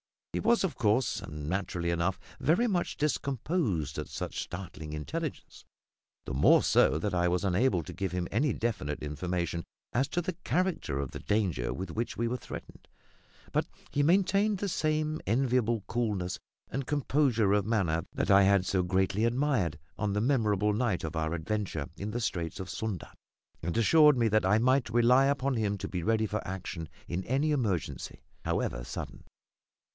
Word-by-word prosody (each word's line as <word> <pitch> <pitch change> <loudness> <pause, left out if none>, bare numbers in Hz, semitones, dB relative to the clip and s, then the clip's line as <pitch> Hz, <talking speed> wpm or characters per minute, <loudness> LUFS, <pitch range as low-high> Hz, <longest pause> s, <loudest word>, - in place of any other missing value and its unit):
He - - 0
was, 235 -2 +3
of 190 - -1
course, 115 +1 +2
and 75 -1 -7
naturally 90 -1 -1
enough, 85 +2 0 0.2
very 175 - +3
much 185 -7 -1
discomposed 135 - -1
at 75 - -4
such - - -4
startling 85 -4 -7
intelligence; 150 - -5 0.6
the - - -4
more 65 - +5
so 70 - +4
that 95 +4 -2
I 90 0 +2
was 90 +2 +1
unable 95 -1 +2
to - - -8
give 95 -3 -3
him 90 -1 -1
any 135 +7 +2
definite 95 -12 -2
information 85 +2 -2 0.3
as 130 +4 +2
to 175 - -1
the 180 +2 -3
character 180 - 0
of 70 -2 -3
the - - -6
danger 95 - 0
with 95 -2 -5
which 115 +6 -3
we 115 - 0
were 125 - -1
threatened; - - -10 0.6
but - - +1 0.2
he 145 - +1
maintained 195 +6 +3
the 200 +1 -2
same 155 -1 0
enviable 120 -1 +2
coolness 105 -7 -1 0.3
and 135 +1 -3
composure 135 -7 +2
of 105 -2 +2
manner 90 -8 +1
that - - 0
I 100 0 +7
had 100 -1 +4
so 95 0 +1
greatly 95 +4 +1
admired 120 - +1 0.2
on 105 -2 0
the 105 - +1
memorable 105 -5 +2
night 110 -4 0
of 80 +1 -4
our 80 0 -1
adventure 85 -4 -2
in 100 +3 -4
the 120 +3 -2
Straits 95 -5 -2
of 95 -1 -5
Sunda, 110 -6 -4 0.5
and 85 +4 -2
assured 150 +5 +6
me 115 -2 +3
that 110 -2 +3
I 100 +3 +4
might 130 0 +3
rely 120 +3 +5
upon 140 -1 +1
him 105 -2 0
to - - -4
be 90 - -3
ready 110 +4 +2
for 105 0 -2
action 90 -3 -5 0.2
in 90 +2 -2
any 140 +5 +1
emergency, 110 - -2 0.2
however - - -1
sudden. - - -7
105 Hz, 175 wpm, -30 LUFS, 90-130 Hz, 0.6 s, I